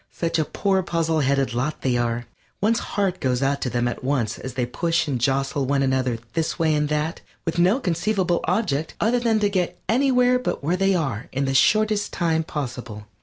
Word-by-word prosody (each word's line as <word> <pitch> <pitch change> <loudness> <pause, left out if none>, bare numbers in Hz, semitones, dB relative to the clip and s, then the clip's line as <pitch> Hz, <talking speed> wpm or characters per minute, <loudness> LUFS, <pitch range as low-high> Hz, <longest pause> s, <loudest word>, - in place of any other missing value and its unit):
Such 165 -1 -1
a 155 - +2
poor 190 +4 0
puzzle 165 -3 0
headed 135 -2 +1
lot 130 +6 -2
they 130 -2 +1
are. 120 0 -1 0.3
One's 220 +2 +2
heart 195 -3 -1
goes 130 0 0
out 140 +1 0
to 125 - -1
them 120 0 0
at 120 - -4
once 130 -6 -1
as 130 -1 -7
they 125 -2 0
push 165 +7 0
and 130 -5 -2
jostle 135 +1 0
one 140 0 +2
another 130 -3 +1 0.2
this 160 -1 -1
way 160 -2 +2
and 150 -1 +1
that, 150 +2 -1 0.2
with 165 +1 -1
no 185 +9 +4
conceivable 180 - 0
object 160 -5 -1
other 240 +3 +2
than 230 -2 +2
to 205 - +4
get 185 -3 -1
anywhere 250 0 +3
but 250 - -3
where 165 +5 +1
they 195 +1 +2
are 135 - -2
in 135 +1 -1
the 135 - 0
shortest 215 +8 +3
time 165 -2 0
possible. 125 -8 -6
155 Hz, 205 wpm, -23 LUFS, 130-190 Hz, 0.3 s, no